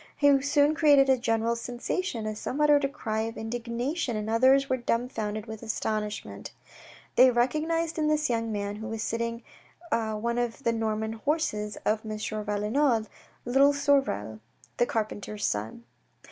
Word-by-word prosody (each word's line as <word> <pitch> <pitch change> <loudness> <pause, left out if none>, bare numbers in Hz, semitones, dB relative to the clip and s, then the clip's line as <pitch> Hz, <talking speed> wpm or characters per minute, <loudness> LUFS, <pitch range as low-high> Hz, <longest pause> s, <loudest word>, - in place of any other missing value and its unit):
He 285 -2 +5
soon 290 +1 +3
created 285 -4 +5
a 265 - +5
general 230 0 +1
sensation, 240 - -3
as 215 0 -4
some 270 - -4
uttered 295 -1 +5
a 275 - +1
cry 220 -6 -3
of 225 +1 -4
indignation, 240 +4 -3
and 215 +1 -3
others 265 +4 +4
were 260 - +1
dumbfounded 225 -3 -2
with 220 -2 -8
astonishment. 215 -2 -3 0.7
They 255 +1 +8
recognised 310 +7 0
in 305 - +1
this 305 0 +2
young 230 -2 -1
man, 205 0 -3
who 220 +1 -6
was 225 -1 -4
sitting 230 +1 -3 0.5
one 225 +1 -1
of 240 +3 -3
the 230 - +2
Norman 220 -1 -1
horses 225 -5 -1
of 215 +1 +1
M. 215 -1 -5
Valenod, 215 +3 0 0.4
little 270 +4 +4
Sorel, 275 - +1 0.4
the 240 - +2
carpenter's 210 -1 -3
son. 110 +3 -3
230 Hz, 150 wpm, -27 LUFS, 215-275 Hz, 0.7 s, They